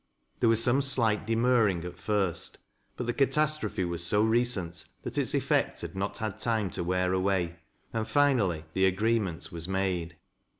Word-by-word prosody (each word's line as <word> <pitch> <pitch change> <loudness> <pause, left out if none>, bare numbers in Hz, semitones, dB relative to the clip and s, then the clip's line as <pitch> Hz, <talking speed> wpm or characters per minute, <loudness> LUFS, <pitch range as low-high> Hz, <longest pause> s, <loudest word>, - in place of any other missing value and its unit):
There 115 - +4
was 115 0 +3
some 130 +3 +3
slight 115 -6 +1
demurring 115 -6 +2
at 90 0 -7
first, 100 -5 -1 0.4
but 125 - -3
the 120 - -1
catastrophe 140 -7 +1
was 85 -1 -1
so 105 +5 +3
recent 110 -7 0 0.2
that - - -5
its - - 0
effect - - 0
had - - -7
not 100 +1 -2
had 110 -3 -4
time 110 -5 0
to - - -3
wear 90 +1 0
away, 95 -2 0 0.4
and 110 -1 -2
finally 115 - +2
the 95 0 +3
agreement 95 -3 0
was 85 -1 -5
made. 90 -3 -2
100 Hz, 165 wpm, -29 LUFS, 90-115 Hz, 0.4 s, There